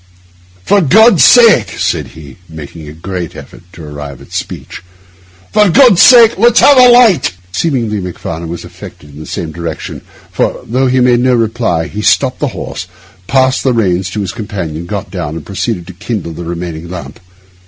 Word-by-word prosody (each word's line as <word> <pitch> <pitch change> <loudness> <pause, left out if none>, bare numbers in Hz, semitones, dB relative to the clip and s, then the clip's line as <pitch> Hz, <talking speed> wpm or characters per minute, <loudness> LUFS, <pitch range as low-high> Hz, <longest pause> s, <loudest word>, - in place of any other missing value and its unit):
'For 205 -1 +3
God's 210 - +5
sake,' 235 -3 +5
said - - -2
he, 70 -5 -13
making 80 0 -10
a - - -9
great 85 +1 -7
effort - - -12
to 85 - -12
arrive 75 -2 -9
at - - -17
speech, - - -7 0.7
'for 210 -2 +4
God's 230 -1 +5
sake, 235 -4 +6
let's 235 +1 +4
have 285 - +6
a 250 -1 +7
light!' 240 - +4 0.2
Seemingly 115 - -2
Macfarlane 85 -2 -6
was 85 0 -7
affected 75 - -13
in 70 - -13
the 80 - -10
same 80 -2 -5
direction; 85 -1 -7 0.3
for, - - -2
though 130 +4 0
he 130 0 +1
made 125 -1 +3
no 125 0 +2
reply, 115 -7 -1
he 105 - -6
stopped - - +1
the - - -1
horse, - - -7 0.4
passed 130 -1 +1
the 130 - +1
reins 95 -5 0
to 105 +2 -4
his 95 - -4
companion, 85 -7 -6
got 100 +1 -6
down, 85 -5 -5
and 80 - -8
proceeded 100 -2 -4
to 95 - -11
kindle 95 -2 -5
the 85 +2 -8
remaining 85 -1 -6
lamp. 85 -5 -9
100 Hz, 180 wpm, -12 LUFS, 85-130 Hz, 0.7 s, a